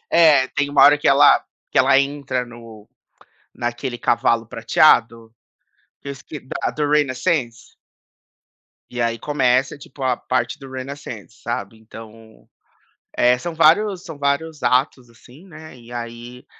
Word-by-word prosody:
É, 155 -6 +5
tem 145 0 -2
uma 140 -1 +4
hora 145 +1 +7
que - - +1
ela - - +5 0.3
que - - +1
ela 135 - +5
entra 140 -2 -2
no 115 -3 -14 0.7
naquele 120 +1 -4
cavalo 115 -1 0
prateado, 115 -1 +2 0.7
que 140 - -10
eu - - -4
esque 140 +2 -10
da 130 - -4
do 150 -1 -2
Renaissance. 145 -3 -1 1.2
E 120 - -5
aí 115 -1 -1
começa 135 -2 0
tipo 135 0 -13
a 130 -1 +1
parte 130 +3 -2
do 135 -2 -12
Renaissance, 130 -5 -8
sabe. 110 -2 -5
Então, 110 0 -15 0.7
eh, 125 0 +3
são 170 +4 -6
vários 180 +4 +3
são 160 -4 -9
vários 145 +2 -2
atos 125 0 0
assim, 125 - -18
né, 155 -4 -13
e 120 0 -16
aí 120 +1 -8
130 Hz, 140 wpm, -20 LUFS, 115-145 Hz, 1.2 s, hora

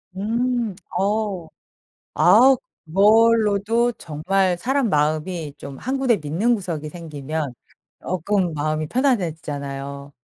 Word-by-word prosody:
음. 235 +2 -1 0.2
어우. 200 -3 -1 0.7
아 265 +2 +6 0.3
그걸로도 220 +4 +3
정말 180 0 -1
사람 265 +5 0
마음이 155 +1 -1
좀 140 -1 -9
한 260 +2 -2
군데 255 -4 +3
믿는 180 +9 0
구석이 170 -8 -4
생기면 155 -4 -5 0.5
쪼끔 185 0 -1
마음이 155 +1 -2
편안해지잖아요. 145 - -2
185 Hz, 230 characters per minute, -22 LUFS, 155-225 Hz, 0.7 s, 아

